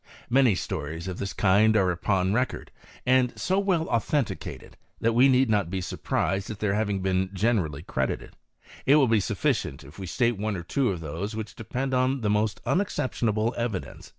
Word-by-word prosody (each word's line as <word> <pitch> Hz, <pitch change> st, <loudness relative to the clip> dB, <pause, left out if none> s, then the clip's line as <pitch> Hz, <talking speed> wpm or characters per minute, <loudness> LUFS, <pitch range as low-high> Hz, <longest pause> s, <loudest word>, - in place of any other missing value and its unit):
Many 130 Hz, -5 st, +5 dB
stories 80 Hz, 0 st, -4 dB
of 95 Hz, -1 st, -5 dB
this 100 Hz, -1 st, -3 dB
kind 105 Hz, +4 st, +4 dB
are 95 Hz, -3 st, +3 dB
upon 95 Hz, +2 st, 0 dB
record, 125 Hz, +3 st, -1 dB, 0.3 s
and 130 Hz, -1 st, +2 dB
so 190 Hz, +2 st, +1 dB
well 185 Hz, -5 st, +1 dB
au 115 Hz, -, +4 dB
thenticated, 140 Hz, +2 st, -3 dB, 0.3 s
that 115 Hz, 0 st, +2 dB
we 125 Hz, +4 st, +6 dB
need 130 Hz, 0 st, +4 dB
not 105 Hz, -5 st, +1 dB
be 95 Hz, +1 st, -2 dB
surprised 95 Hz, +1 st, -2 dB
at 110 Hz, -, -5 dB
th^ 105 Hz, -1 st, 0 dB
having 100 Hz, -2 st, -1 dB
been 95 Hz, 0 st, +1 dB
generally 95 Hz, -8 st, 0 dB
credited. -, -, -3 dB, 0.5 s
It 140 Hz, -, +7 dB
will 145 Hz, -4 st, +5 dB
be 110 Hz, -2 st, +3 dB
sufficient 70 Hz, -6 st, -1 dB
if 75 Hz, +7 st, -13 dB
we 95 Hz, -, -5 dB
state 120 Hz, +2 st, +1 dB
one 105 Hz, 0 st, -1 dB
or 85 Hz, -, -6 dB
two 130 Hz, +8 st, 0 dB
of 90 Hz, -4 st, -3 dB
those 85 Hz, +8 st, -4 dB
which 110 Hz, -1 st, -5 dB
depend 130 Hz, +5 st, -3 dB
upon 130 Hz, +1 st, +1 dB
the 105 Hz, -2 st, +1 dB
most 105 Hz, 0 st, 0 dB
unexceptionable 120 Hz, -, 0 dB
evidence. 115 Hz, -5 st, -4 dB
105 Hz, 185 wpm, -26 LUFS, 95-125 Hz, 0.5 s, It